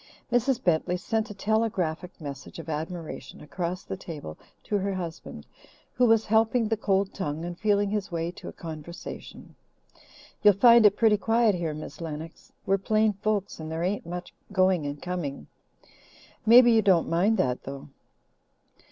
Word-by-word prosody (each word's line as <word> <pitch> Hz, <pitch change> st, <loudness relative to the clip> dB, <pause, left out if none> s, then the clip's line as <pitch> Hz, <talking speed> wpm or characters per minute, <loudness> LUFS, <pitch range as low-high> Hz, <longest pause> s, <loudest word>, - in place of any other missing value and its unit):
Mrs. 245 Hz, +1 st, +1 dB
Bentley 175 Hz, +1 st, +1 dB
sent 220 Hz, +5 st, -2 dB
a 210 Hz, -, -8 dB
telegraphic 195 Hz, -5 st, -1 dB
message 140 Hz, -3 st, -8 dB
of 165 Hz, -1 st, -8 dB
admiration 160 Hz, +2 st, -6 dB
across 175 Hz, +4 st, -4 dB
the -, -, -5 dB
table 155 Hz, -, -8 dB, 0.3 s
to 205 Hz, -, -1 dB
her 195 Hz, 0 st, -2 dB
husband, 170 Hz, -3 st, -7 dB, 0.5 s
who 250 Hz, -1 st, +3 dB
was 225 Hz, -1 st, +4 dB
helping 225 Hz, +1 st, +2 dB
the 225 Hz, -, +1 dB
cold 195 Hz, -2 st, 0 dB
tongue 160 Hz, -3 st, -4 dB
and 175 Hz, 0 st, -5 dB
feeling 205 Hz, +1 st, +1 dB
his 205 Hz, -2 st, -2 dB
way 165 Hz, 0 st, -2 dB
to -, -, -11 dB
a -, -, -5 dB
conversation. 165 Hz, +1 st, -9 dB, 0.9 s
"You'll 205 Hz, -2 st, +6 dB
find 235 Hz, +1 st, +7 dB
it 205 Hz, -, +1 dB
pretty 220 Hz, -2 st, +4 dB
quiet 225 Hz, +1 st, +3 dB
here, 165 Hz, -4 st, -2 dB
Miss 155 Hz, +1 st, -9 dB
Lennox. 160 Hz, 0 st, -7 dB
We're 195 Hz, 0 st, +2 dB
plain 215 Hz, +2 st, +2 dB
folks 200 Hz, -1 st, -2 dB
and 160 Hz, 0 st, -6 dB
there 165 Hz, +1 st, -2 dB
ain't 185 Hz, -1 st, -2 dB
much 180 Hz, +1 st, -6 dB, 0.2 s
going 185 Hz, -5 st, +2 dB
and 145 Hz, 0 st, -5 dB
coming. 165 Hz, -, -4 dB, 1.0 s
Maybe 240 Hz, +1 st, +8 dB
you 225 Hz, -1 st, +5 dB
don't 190 Hz, -5 st, +3 dB
mind 195 Hz, +7 st, +2 dB
that, 125 Hz, -7 st, 0 dB
though?" 135 Hz, +1 st, -8 dB
185 Hz, 160 wpm, -27 LUFS, 165-215 Hz, 1.0 s, Maybe